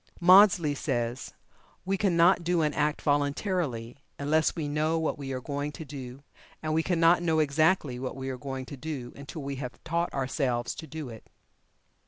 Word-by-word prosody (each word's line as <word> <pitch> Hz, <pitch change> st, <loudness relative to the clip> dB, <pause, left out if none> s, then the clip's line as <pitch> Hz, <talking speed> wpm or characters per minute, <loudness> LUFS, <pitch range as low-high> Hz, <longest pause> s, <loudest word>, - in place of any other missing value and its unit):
Maudsley 180 Hz, -3 st, +6 dB
says: 120 Hz, -2 st, -3 dB, 0.5 s
"We 195 Hz, +1 st, +1 dB
cannot 180 Hz, -2 st, +4 dB
do 170 Hz, -1 st, +1 dB
an 150 Hz, -1 st, +1 dB
act 150 Hz, +1 st, 0 dB
voluntarily 145 Hz, -, -1 dB, 0.2 s
unless 155 Hz, +2 st, +1 dB
we 155 Hz, -3 st, -3 dB
know 155 Hz, +2 st, 0 dB
what 160 Hz, -1 st, -1 dB
we 135 Hz, -2 st, -6 dB
are 130 Hz, -, -2 dB
going 145 Hz, +2 st, -3 dB
to 160 Hz, -, -8 dB
do, 135 Hz, -2 st, -9 dB, 0.4 s
and 155 Hz, 0 st, -1 dB
we 160 Hz, -, +3 dB
cannot 170 Hz, 0 st, +3 dB
know 165 Hz, -2 st, +1 dB
exactly 155 Hz, -2 st, +2 dB
what 130 Hz, -1 st, -4 dB
we 135 Hz, 0 st, -5 dB
are 130 Hz, -, -4 dB
going 135 Hz, -1 st, -5 dB
to 140 Hz, -, -8 dB
do 130 Hz, -4 st, -6 dB
until 140 Hz, +2 st, -8 dB
we 140 Hz, 0 st, -4 dB
have 125 Hz, -2 st, -6 dB
taught 170 Hz, +1 st, -1 dB
ourselves 130 Hz, -3 st, -1 dB
to 160 Hz, -, -9 dB
do 155 Hz, -3 st, -6 dB
it." 110 Hz, -2 st, -12 dB
150 Hz, 180 wpm, -28 LUFS, 135-165 Hz, 0.5 s, Maudsley